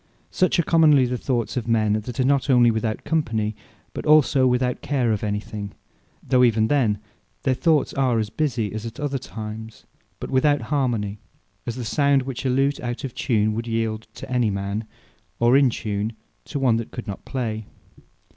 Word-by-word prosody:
Such 185 - +2
are 170 - +3
Commonly 155 -5 +5
the 125 +1 -2
thoughts 125 -1 -2
of 120 -2 -3
men, 110 -2 +2
that 110 +4 -4
are - - +4
not 140 +1 +2
onely 120 -3 +6
without 110 0 -2
company, 115 -9 -1 0.4
but - - -5
also 150 -3 +5
without 125 0 0
care 130 -5 0
of 105 -1 -1
any 105 -1 -1
thing; 105 -1 -7 0.5
though 125 -1 +4
even 110 -2 +3
then 120 -8 +2 0.5
their 130 - +2
Thoughts 155 +2 +2
are 130 -4 +1
as 110 -2 -1
busie 120 -9 -1
as 110 0 -4
at 115 -1 -7
other 140 -2 -2
times, 110 -2 -8 0.3
but - - -6
without 145 +2 +3
harmony; 115 -7 0 0.5
as 120 - -2
the 125 -2 -5
sound 140 +1 +2
which 130 0 -4
a - - +2
Lute 135 +2 +1
out 120 0 -4
of 135 -3 -4
tune 110 -4 +1
would 115 +2 -4
yeeld 115 -1 -2
to - - -8
any 125 -4 +1
man; 100 +2 -3 0.5
or 120 +2 +4
in 135 -2 +5
tune, 105 -1 -3 0.3
to 145 - -5
one 130 -5 +3
that 115 - -4
could 120 - -7
not 100 -3 -6
play. 110 -5 -4
120 Hz, 190 wpm, -23 LUFS, 110-135 Hz, 0.5 s, onely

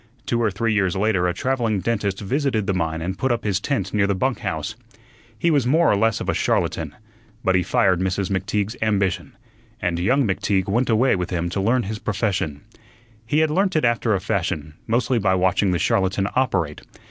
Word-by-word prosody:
Two 120 0 0
or 115 - +2
three 110 +3 -1
years 95 -3 +1
later 95 -3 +1
a - - +1
travelling 120 -6 0
dentist 100 -1 -1
visited 125 0 0
the 95 - 0
mine 80 -2 -2
and 95 +2 -4
put 130 - +1
up 120 0 -1
his 100 -2 0
tent 100 -6 -2
near 105 -2 +2
the 100 - +1
bunk 130 +6 0
house. 95 -1 -3 0.6
He 170 +8 +2
was 140 -5 +2
more 160 +4 +4
or - - +3
less 110 +1 +1
of - - -5
a - - +1
charlatan, - - -1 0.5
but 95 - +2
he 95 - +3
fired 90 0 +2
Mrs. 95 +1 -1
McTeague's 100 +3 -1
ambition, 95 -4 0 0.4
and 85 -2 -1
young 125 +9 +2
McTeague 95 -1 0
went 120 +6 +1
away 120 +3 +3
with 90 -2 -3
him 85 -1 -1
to 95 +3 -2
learn 120 +5 +2
his 105 +2 -5
profession. 95 -9 -2 0.7
He 150 +6 +2
had 160 -1 +2
learnt 190 +3 +1
it 155 - +2
after 115 -2 +2
a - - 0
fashion, 75 -3 -2
mostly 120 +2 +1
by 95 -2 +2
watching 95 +2 +2
the 90 - +1
charlatan 95 +2 +1
operate. 95 - 0
100 Hz, 205 wpm, -22 LUFS, 95-120 Hz, 0.7 s, more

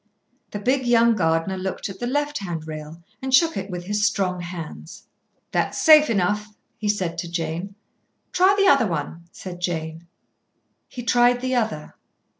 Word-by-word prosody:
The - - -5
big, 255 +4 0
young 235 -1 +4
gardener 165 +1 0
looked 185 0 -4
at 195 -1 -9
the 240 - -2
left 290 +3 -1
hand 170 -5 -5
rail 155 +2 -8 0.2
and 265 0 -3
shook 325 +5 +4
it 195 +1 -4
with 180 -1 -5
his 205 +3 -1
strong 185 -3 +1
hands. 170 -1 -8 0.5
"That's - - -1
safe 305 -2 +7
enough," 210 +1 0 0.2
he 210 - -2
said 180 -5 -1
to 170 -1 -4
Jane. 170 +3 -4 0.6
"Try 375 +2 +4
the 400 - +4
other," 220 - +2
said 180 -2 -9
Jane. 165 -1 -4 0.8
He 245 - -8
tried 245 +1 +3
the 255 +1 -2
other. 220 -11 -2
195 Hz, 160 wpm, -23 LUFS, 170-245 Hz, 0.8 s, safe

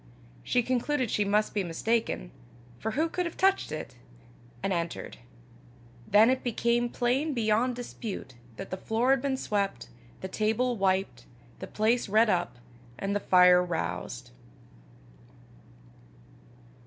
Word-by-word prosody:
She 245 - +1
concluded 255 0 0
she 210 - +1
must 210 +1 +1
be 205 - 0
mistaken, 175 - -1 0.5
for 220 0 -3
who 315 +5 +1
could 360 +1 -2
have 340 - -9
touched 385 - +2
it? 150 -5 -6 0.7
and 195 - 0
entered. 170 -1 -4 0.9
Then 215 +4 +6
it 260 - -1
became 240 0 +1
plain 265 +6 0
beyond 230 +2 +1
dispute 225 - -7 0.2
that - - -8
the 185 - -3
floor 230 +6 +1
had 270 -2 +3
been 270 -1 -1
swept, 200 - -2 0.3
the 190 - -4
table 220 +5 0
wiped, 190 - 0 0.3
the - - -6
place 225 +1 0
redd 215 +2 +4
up, 175 -8 -1 0.4
and 200 +5 -2
the - - +1
fire 180 -2 +6
roused. 120 - -4
215 Hz, 130 wpm, -28 LUFS, 185-245 Hz, 0.9 s, Then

